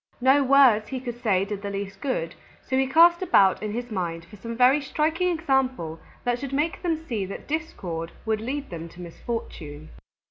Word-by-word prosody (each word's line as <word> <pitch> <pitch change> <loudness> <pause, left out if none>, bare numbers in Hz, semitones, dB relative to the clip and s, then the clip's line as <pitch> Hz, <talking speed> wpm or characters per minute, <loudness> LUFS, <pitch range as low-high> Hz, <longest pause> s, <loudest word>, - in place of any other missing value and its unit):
No 265 +3 +5
words 260 -6 +5
he 265 - -4
could 240 -1 -7
say 195 -4 +2
did 205 -1 -5
the 200 - -4
least 195 -1 -5
good, 255 - -2 0.3
so 260 - 0
he 265 0 +2
cast 340 +5 +6
about 195 - +4
in 215 -1 -3
his 240 +2 -5
mind 170 -4 -3
for 200 +5 -14
some 230 +3 -7
very 255 +4 +5
striking 315 +5 0
example 265 - 0 0.2
that 245 0 0
should 275 0 -5
make 300 +4 0
them 335 -3 0
see 225 -9 -2
that 195 - -8
discord 180 - -4
would 220 -1 0
lead 275 +3 -4
them 165 -1 -6
to 170 - -16
misfortune. 165 -5 -6
240 Hz, 190 wpm, -25 LUFS, 195-275 Hz, 0.3 s, cast